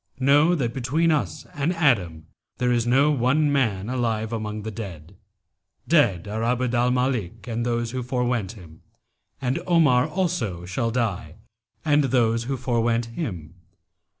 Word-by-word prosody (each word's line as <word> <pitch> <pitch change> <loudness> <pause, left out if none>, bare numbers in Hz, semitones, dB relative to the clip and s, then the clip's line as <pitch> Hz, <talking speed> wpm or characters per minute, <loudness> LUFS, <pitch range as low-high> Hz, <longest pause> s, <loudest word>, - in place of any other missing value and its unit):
Know 145 +6 +4
that 120 -7 -2
between 145 +6 +1
us 150 - -1
and 150 +1 0
Adam 95 - +1 0.3
there 125 0 +1
is 120 -1 +1
no 135 +5 +4
one 145 +3 +2
man 110 -8 0
alive 115 -3 -1
among 105 -1 -4
the 110 - -5
dead. 95 -5 -8 0.7
Dead 105 - +3
are 110 +2 -3
Abd 125 +1 0
al 120 +1 +2
Malik 125 -6 -1
and 115 0 -2
those 120 -1 -1
who 130 0 -3
forewent 125 -5 -1
him, 85 -7 -14 0.6
and 130 0 -1
Omar 155 -7 +4
also 155 - -2
shall 95 +6 -1
die 105 -9 -2 0.5
and 150 -1 +3
those 115 -3 +1
who 135 +1 -2
forewent 120 -2 0
him.' 90 - -5
120 Hz, 150 wpm, -24 LUFS, 110-135 Hz, 0.7 s, Know